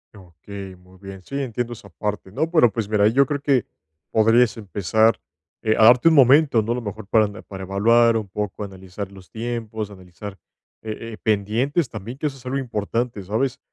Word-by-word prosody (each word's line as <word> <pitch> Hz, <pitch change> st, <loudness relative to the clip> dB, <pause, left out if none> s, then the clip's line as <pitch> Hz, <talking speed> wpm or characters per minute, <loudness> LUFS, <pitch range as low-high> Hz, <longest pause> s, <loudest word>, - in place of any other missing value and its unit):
Okey, 95 Hz, +1 st, -10 dB
muy 90 Hz, +1 st, -20 dB
bien. 95 Hz, -1 st, -9 dB
Sí, 140 Hz, -, -9 dB
entiendo 120 Hz, -1 st, -3 dB
esa 100 Hz, -3 st, -13 dB
parte, 105 Hz, +1 st, -4 dB
¿no? 160 Hz, +9 st, -1 dB
Pero, 155 Hz, -9 st, +4 dB
pues, 105 Hz, 0 st, -3 dB
mira, 105 Hz, -1 st, +4 dB
yo 135 Hz, +6 st, +4 dB
creo 140 Hz, +1 st, -3 dB
que 135 Hz, -5 st, +2 dB, 0.5 s
podrías 115 Hz, +1 st, +4 dB
empezar, 110 Hz, +2 st, +1 dB, 0.4 s
eh, 110 Hz, -1 st, +2 dB
a -, -, +5 dB
darte 125 Hz, +6 st, +6 dB
un 165 Hz, -, +6 dB
momento, 135 Hz, -2 st, +6 dB
¿no? 110 Hz, -, -3 dB
A -, -, +1 dB
lo 125 Hz, -, -3 dB
mejor 105 Hz, -1 st, -7 dB
para 110 Hz, +1 st, +4 dB
ana 105 Hz, +1 st, -8 dB
para 95 Hz, -1 st, -9 dB
evaluar 115 Hz, +5 st, +4 dB
un 105 Hz, -3 st, -5 dB
poco, 105 Hz, 0 st, -4 dB
analizar 95 Hz, 0 st, -8 dB
los 95 Hz, -2 st, -15 dB
tiempos, 110 Hz, -2 st, -4 dB
analizar, 95 Hz, +1 st, -10 dB, 0.4 s
eh 110 Hz, +1 st, -6 dB
eh, 110 Hz, -, -8 dB
pendientes 115 Hz, -, 0 dB
también, 115 Hz, +4 st, -7 dB
que 150 Hz, -, -1 dB
eso 135 Hz, -2 st, -6 dB
es 130 Hz, -, -17 dB
algo 130 Hz, +2 st, -2 dB
importante, 115 Hz, -2 st, -2 dB
¿sabes? 120 Hz, +7 st, -1 dB
110 Hz, 195 wpm, -22 LUFS, 100-120 Hz, 0.5 s, darte